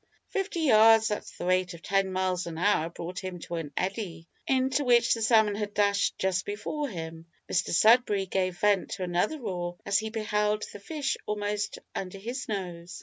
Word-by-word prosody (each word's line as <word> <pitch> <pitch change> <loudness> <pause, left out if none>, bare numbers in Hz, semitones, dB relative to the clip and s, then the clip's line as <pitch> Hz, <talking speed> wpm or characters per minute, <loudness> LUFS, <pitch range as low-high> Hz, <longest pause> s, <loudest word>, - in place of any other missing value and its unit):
Fifty 390 -3 -2
yards 225 -5 +6
at 210 - -3
the - - -5
rate 185 0 +1
of 170 - -14
ten 195 -1 +1
miles 185 -1 -1
an 165 -1 -6
hour 175 -3 +2
brought 175 +2 -6
him 185 -1 -5
to - - -8
an 155 -3 -5
eddy, 185 -4 -3 0.2
into 265 +2 +2
which 240 -2 +4
the 225 - -3
salmon 220 -2 +4
had 205 0 -4
dashed 200 -1 +2
just 190 0 0
before 270 +8 -3
him. 165 -3 -7 0.2
Mr - - 0
Sudberry 215 0 +4
gave 185 -1 -1
vent 205 -1 +2
to 190 - -4
another 180 - 0
roar 175 -6 -4
as 200 0 +2
he 220 0 -4
beheld 210 -1 0
the 205 - -8
fish 285 +5 -2
almost 210 0 -2 0.2
under 190 0 -5
his 240 +7 -5
nose. 180 -4 -5
200 Hz, 185 wpm, -28 LUFS, 180-220 Hz, 0.2 s, yards